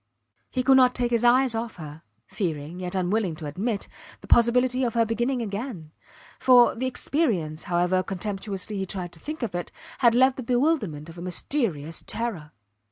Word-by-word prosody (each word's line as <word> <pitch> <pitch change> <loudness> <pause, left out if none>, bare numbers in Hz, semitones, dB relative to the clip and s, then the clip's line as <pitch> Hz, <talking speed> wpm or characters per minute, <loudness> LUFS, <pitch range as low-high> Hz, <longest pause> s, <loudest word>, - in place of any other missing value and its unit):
He 255 - -1
could 265 0 +6
not 250 -1 +5
take 245 -1 0
his 235 -1 +2
eyes 250 +1 +4
off 225 0 -4
her, 155 -2 -9 0.2
fearing, 165 -2 -4
yet 180 +1 -5
unwilling 185 -1 0
to 155 -1 -8
admit, 200 +8 -3 0.3
the - - -12
possibility 250 +2 +3
of 235 -2 -1
her 230 -1 +4
beginning 240 +3 -1
again; 200 - -5 0.5
for, 250 -2 +6
the 255 +3 -2
experience, 210 - -1
however 180 +1 +1
contemptuously 195 +1 -4
he 190 - -3
tried 180 -2 -4
to 170 - -14
think 305 - -6
of 230 - -3
it, 175 0 -4 0.3
had 235 -2 +5
left 260 +1 +4
the - - -4
bewilderment 240 - 0
of 170 +1 -10
a - - -7
mysterious 175 - -2
terror. 200 -11 -4
215 Hz, 175 wpm, -25 LUFS, 175-245 Hz, 0.5 s, could